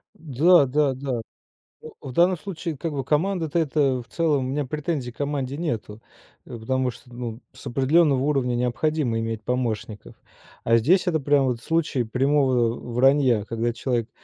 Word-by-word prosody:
Да-да-да. 140 Hz, -4 st, +2 dB, 0.6 s
О, -, -, -10 dB
в 135 Hz, -, -7 dB
данном 175 Hz, +5 st, +3 dB
случае, 165 Hz, -3 st, -6 dB
как 165 Hz, +4 st, -3 dB
бы, 135 Hz, -2 st, -2 dB
команда-то, 165 Hz, +2 st, 0 dB
это 140 Hz, -4 st, +1 dB
в 120 Hz, -, -16 dB
целом, 150 Hz, -6 st, 0 dB
у -, -, -3 dB
меня 145 Hz, +2 st, -1 dB
претензий 145 Hz, -2 st, -3 dB
к -, -, -26 dB
команде 140 Hz, -2 st, -2 dB
нету. 115 Hz, -9 st, -4 dB, 0.4 s
Э, 120 Hz, -, -8 dB
потому 130 Hz, +3 st, -1 dB
что, 125 Hz, +1 st, -16 dB
ну, 120 Hz, -1 st, -6 dB
с -, -, -14 dB
определенного 140 Hz, +2 st, +3 dB
уровня 135 Hz, -4 st, 0 dB
необходимо 125 Hz, 0 st, 0 dB
иметь 115 Hz, -1 st, -4 dB
помощников. 115 Hz, -4 st, -3 dB, 0.5 s
А 115 Hz, -, +4 dB
здесь 175 Hz, -, +3 dB
это 160 Hz, -3 st, +1 dB
прям 145 Hz, -1 st, +2 dB
вот 125 Hz, -3 st, -2 dB
случай 155 Hz, -4 st, 0 dB
прямого 130 Hz, -1 st, +2 dB, 0.2 s
вранья, 130 Hz, -3 st, +3 dB
когда 115 Hz, +1 st, -2 dB
человек 120 Hz, -1 st, -2 dB
135 Hz, 155 wpm, -24 LUFS, 120-150 Hz, 0.6 s, А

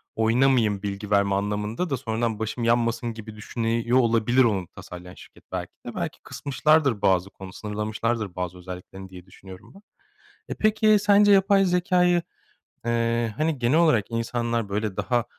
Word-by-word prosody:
oynamayayım 115 Hz, -3 st, +2 dB
bilgi 100 Hz, +1 st, -5 dB
verme 100 Hz, -1 st, +3 dB
anlamında 105 Hz, -, -2 dB
da 135 Hz, -, -1 dB
sonradan 115 Hz, -3 st, -2 dB
başım 110 Hz, +2 st, -3 dB
yanmasın 115 Hz, 0 st, +1 dB
gibi 110 Hz, -1 st, -10 dB
düşünüyor 115 Hz, +2 st, -1 dB
olabilir, 120 Hz, +2 st, +3 dB
onu 100 Hz, -6 st, 0 dB
tasarlayan 90 Hz, 0 st, -10 dB
şirket, -, -, -16 dB
belki -, -, -5 dB
de, -, -, -7 dB
belki -, -, -4 dB
kısmışlardır 140 Hz, -4 st, +1 dB
bazı 95 Hz, -1 st, +2 dB
konu 95 Hz, -1 st, -11 dB
sınırlamışlardır 105 Hz, -1 st, -3 dB
bazı 90 Hz, -1 st, -4 dB
özelliklerini 90 Hz, +1 st, -10 dB
diye 90 Hz, -1 st, -12 dB
düşünüyorum 95 Hz, 0 st, -14 dB
ben. 195 Hz, -, -15 dB, 0.7 s
E, -, -, -12 dB
peki, 215 Hz, 0 st, +3 dB
sence 205 Hz, 0 st, +5 dB
yapay 195 Hz, 0 st, +4 dB
zekâyı, 180 Hz, -1 st, +2 dB, 0.7 s
eee, 115 Hz, -1 st, 0 dB
hani, 155 Hz, -2 st, 0 dB
genel 125 Hz, +6 st, +2 dB
olarak 155 Hz, -12 st, +3 dB
insanlar, 115 Hz, -1 st, -2 dB
böyle, 105 Hz, -1 st, -3 dB
daha 120 Hz, -1 st, 0 dB
115 Hz, 150 wpm, -24 LUFS, 100-130 Hz, 0.7 s, sence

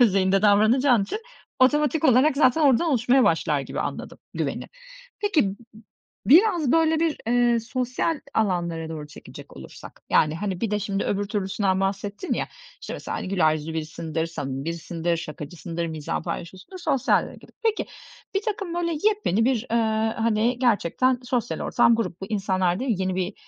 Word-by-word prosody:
düzeyinde 195 Hz, -3 st, +3 dB
davranacağın 220 Hz, +4 st, +4 dB
için 205 Hz, -, -4 dB, 0.4 s
otomatik 295 Hz, +3 st, +3 dB
olarak 270 Hz, +2 st, +4 dB
zaten 300 Hz, +1 st, +4 dB
oradan 280 Hz, +4 st, +4 dB
oluşmaya 250 Hz, +1 st, +3 dB
başlar 160 Hz, -3 st, +1 dB
gibi -, -, -5 dB
anladım, -, -, -5 dB, 0.2 s
güveni. -, -, -3 dB, 0.6 s
Peki, 410 Hz, -7 st, +2 dB
m 195 Hz, -1 st, -2 dB, 0.7 s
biraz, 335 Hz, -, +5 dB
böyle, 320 Hz, -1 st, +3 dB
bir, 330 Hz, -2 st, +1 dB
eee, 240 Hz, -1 st, +3 dB
sosyal 250 Hz, +6 st, -2 dB
alanlara 170 Hz, -6 st, -1 dB
doğru 155 Hz, -2 st, -6 dB
çekecek 145 Hz, -, -13 dB
olursak, 65 Hz, 0 st, -12 dB
yani, 155 Hz, 0 st, +3 dB
hani, 190 Hz, -1 st, -3 dB
bir 230 Hz, -, -1 dB
de 210 Hz, -, +1 dB
şimdi 200 Hz, -1 st, -2 dB
öbür 205 Hz, 0 st, -1 dB
türlüsünden 195 Hz, -1 st, -1 dB
bahsettin 200 Hz, -, -3 dB
ya, -, -, -3 dB, 0.3 s
işte, -, -, -7 dB
mesela, -, -, -5 dB
hani, -, -, -5 dB
güler 165 Hz, -5 st, +3 dB
yüzlü 155 Hz, +1 st, -5 dB
birisindir, 160 Hz, +1 st, -3 dB
samimi 135 Hz, -4 st, -5 dB
birisindir, 170 Hz, +1 st, -2 dB
şakacısındır, 165 Hz, +2 st, -6 dB
mizahı 155 Hz, -2 st, -4 dB
paylaşıyorsundur, 190 Hz, -, -7 dB
sosyalliğe 285 Hz, -7 st, +1 dB
gidip. -, -, -17 dB
Peki, 445 Hz, -1 st, +1 dB, 0.5 s
birtakım, 395 Hz, -4 st, -2 dB
böyle, 340 Hz, -1 st, -1 dB
yepyeni 410 Hz, -, +2 dB
bir, 250 Hz, -2 st, 0 dB
ııı, 220 Hz, -1 st, +1 dB
hani, 230 Hz, +2 st, +1 dB
gerçekten 245 Hz, +2 st, +2 dB
sosyal 245 Hz, -1 st, -2 dB
ortam 235 Hz, -1 st, +3 dB
grup 180 Hz, -6 st, -3 dB
bu. 190 Hz, -, -5 dB
İnsanlar 190 Hz, -3 st, 0 dB
değil 260 Hz, -2 st, -1 dB
mi? -, -, -6 dB
Yeni 185 Hz, 0 st, -1 dB
bir 185 Hz, +2 st, -2 dB
215 Hz, 160 wpm, -24 LUFS, 175-260 Hz, 0.7 s, biraz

